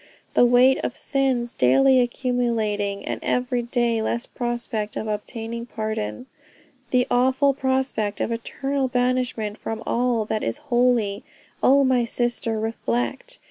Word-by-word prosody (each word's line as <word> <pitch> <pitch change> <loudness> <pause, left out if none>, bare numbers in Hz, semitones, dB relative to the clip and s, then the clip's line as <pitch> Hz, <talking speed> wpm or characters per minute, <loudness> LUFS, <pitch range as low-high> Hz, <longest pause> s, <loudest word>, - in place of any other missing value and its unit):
The - - +5
weight 250 +2 +5
of 245 - -3
sins 260 -4 0
daily 260 - +4
accumulating, 230 -5 -1
and - - -3
every 250 0 0
day 235 -1 0
less 235 +2 -1
prospect 240 -3 -3
of 220 - -3
obtaining 225 +2 -4
pardon. 215 - -4 0.6
The 250 -1 +3
awful 260 +3 +3
prospect 260 -6 -1
of - - -1
eternal 270 +4 -2
banishment 245 -4 -1
from 225 +1 -5
all 240 -2 +1
that 215 0 -2
is - - -2 0.2
holy, 240 -5 +2 0.4
oh 275 +1 +5
my 260 -2 +3
sister, 235 -1 -1
reflect.... 120 - -3
240 Hz, 130 wpm, -23 LUFS, 220-255 Hz, 0.6 s, The